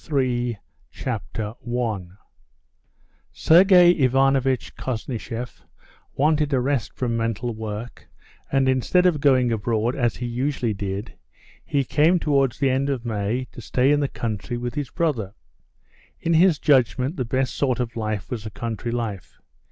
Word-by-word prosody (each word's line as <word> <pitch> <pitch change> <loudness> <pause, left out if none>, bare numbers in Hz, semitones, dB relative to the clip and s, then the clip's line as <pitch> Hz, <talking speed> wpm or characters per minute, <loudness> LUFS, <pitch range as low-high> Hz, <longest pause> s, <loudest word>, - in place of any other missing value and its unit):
PART - - -21
THREE 125 -5 0 0.3
Chapter 110 -3 -4
1 110 -7 -3 1.1
Sergey 180 +1 +6
Ivanovitch 135 -3 +2
Koznishev 120 0 -5 0.5
wanted 150 +1 +2
a 135 - +2
rest 130 -2 -1
from 120 -3 -1
mental 115 +1 -2
work, 110 +2 -7 0.4
and 135 -1 +2
instead 130 +8 +2
of 170 -5 +3
going 130 -4 +4
abroad 115 +2 0
as 120 -4 0
he 125 - -5
usually 120 -1 -1
did, 100 +2 -5 0.5
he 140 -1 0
came 155 +7 +3
towards 140 -6 +1
the 135 -2 +2
end 135 +2 0
of 130 -4 -2
May 110 +3 -2
to - - -10
stay 130 +4 +2
in 145 - +3
the 145 - +1
country 115 0 -4
with 120 0 -4
his 145 -2 -3
brother. 120 - -2 0.8
In 170 0 0
his 170 0 +5
judgment 130 +1 +2
the 130 - -2
best 130 +2 -1
sort 130 -4 0
of 120 -2 -3
life 110 -1 -3
was 115 -4 -4
a - - -5
country 115 +2 -5
life. 115 -6 -4
125 Hz, 150 wpm, -23 LUFS, 115-140 Hz, 1.1 s, Sergey